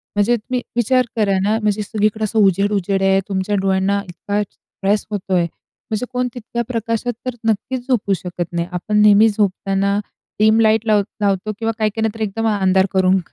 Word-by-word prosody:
म्हणजे 205 +4 +3
तुम्ही 245 +3 -3
विचार 250 +2 +2
करा 205 -4 +2
ना, 210 +2 +2
म्हणजे 210 -1 0
सगळीकडे 215 +1 -1
असं 215 +1 0
उजेड-उजेड 195 0 +2
आहे, 195 0 +4
तुमच्या 195 +1 -1
डोळ्यांना 195 +1 +1
इतका 205 +3 -2
स्ट्रेस 200 +1 -3
होतो 195 -2 -3
आहे, 180 -2 +3 0.5
म्हणजे 220 +2 -2
कोण 250 0 0
तितक्या 235 0 -4
प्रकाशात 230 0 -2
तर 255 -1 -3
नक्कीच 245 +4 -2
झोपू 225 -6 +1
शकत 175 -1 -4
नाही. 170 0 -2
आपण 180 +4 -1
नेहमी 210 +1 +6
झोपताना 200 -1 0 0.4
डिम 215 +1 +5
लाईट 220 0 +3
लाव 210 -1 +4 0.2
लावतो 200 +1 0
किंवा 225 0 0
काही-काहींना 220 0 0
तर 225 - -8
एकदम 225 +2 -2
अंधार 190 0 +3
करून 190 0 +3
210 Hz, 170 wpm, -19 LUFS, 195-225 Hz, 0.5 s, नेहमी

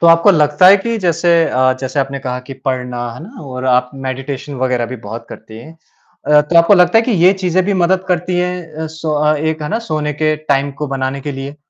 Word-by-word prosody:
तो 170 - +4
आपको 165 +4 +6
लगता 150 +1 +3
है 200 - +8
कि 230 +3 -3
जैसे 175 -2 0 0.2
अ, 130 0 +2
जैसे 135 +2 -2
आपने 135 0 -3
कहा 125 -2 -4
कि - - -6
पढ़ना, 125 -2 -3
है - - -11
ना, 230 +5 -12
और 130 -2 -7
आप 125 -1 +2 0.2
मेडिटेशन 135 +2 -5
वग़ैरह 125 -2 0
भी 125 +2 -7
बहुत 115 +2 -7
करती 110 0 -11
हैं, 125 +8 -12 0.5
अ, 150 0 +5
तो 150 +3 -1
आपको 170 +5 +6
लगता 180 +4 +4
है - - +3
कि 245 - 0
ये 185 - +7
चीज़ें 180 +1 +1
भी 200 +1 0
मदद 190 +1 +1
करती 180 0 -1
हैं 180 -3 -4
अ, - - -4
सो 160 -1 -3
अ, 150 +1 +2
एक 155 +1 -2
है 150 - -4
ना, 225 - -1
सोने 150 -1 -2
के 155 +1 0 0.2
टाइम 140 +1 0
को 150 - -1
बनाने 130 +1 -3
के 145 +1 -5
लिए? 135 +2 -7
150 Hz, 240 wpm, -16 LUFS, 130-175 Hz, 0.5 s, है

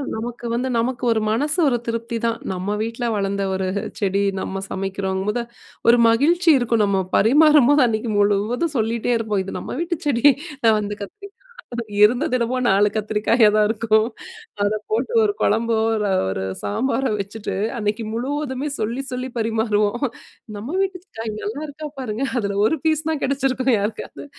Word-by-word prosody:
நமக்கு 240 +2 -6
வந்து 255 +2 -1
நமக்கு 240 +1 -2
ஒரு 220 - 0
மனசு 295 +9 0
ஒரு 245 -3 +1
திருப்திதான். 230 0 -2 0.2
நம்ம 190 +3 -2
வீட்டில 230 +1 -3
வளர்ந்த 195 0 -1
ஒரு 190 0 -1 0.3
செடி 200 0 +1 0.2
நம்ம 195 0 -4
சமைக்கிறோங்கும்போது, 195 +3 -2 0.5
ஒரு 235 0 +6
மகிழ்ச்சி 330 +9 +3
இருக்கும். 230 -3 +1
நம்ம 195 -1 +1
பரிமாறும்போது 290 +3 +5
அன்னைக்கு 220 0 -2
முழுவதும் 215 +10 +1
சொல்லிட்டே 230 +2 0
இருப்போம். 210 -4 -1
இது - - -5
நம்ம - - -6
வீட்டு 345 0 -1
செடி, 240 -2 +1 0.6
அந்த 205 0 -4
கத்திரிக்கா, 400 - -10 0.7
இருந்தது 250 +6 +3
என்னமோ 240 +2 -1
4 200 +2 +4
கத்தரிக்காயா 215 +1 +3
தான் 210 -1 +4
இருக்கும். 220 -1 +2 0.6
அத 205 - +2 0.2
போட்டு 235 - 0
ஒரு 410 -1 +1
கொழம்போ, 225 +1 +2 0.5
ஒரு 95 0 -3 0.2
சாம்பாரோ 260 - 0
வச்சுட்டு 200 +2 -5 0.2
அன்னைக்கு 215 +1 -1
முழுவதுமே 275 +3 -2
சொல்லி 235 +5 -2
சொல்லி 255 +1 -3
பரிமாறுவோம். 220 +1 0 0.5
"நம்ம 265 - -4
வீட்டுக்காய் 365 - -4
நல்லா 230 +9 -4
இருக்கா 300 +1 -7
பாருங்க" 245 +1 -2
அதுல 200 -2 -2
ஒரு 320 - +2
பீஸ் 315 0 +1
தான் 310 -3 -2
கிடைச்சிருக்கும் 265 -2 +1
யாருக்காவது. 210 +7 -5
230 Hz, 145 wpm, -21 LUFS, 210-265 Hz, 0.7 s, ஒரு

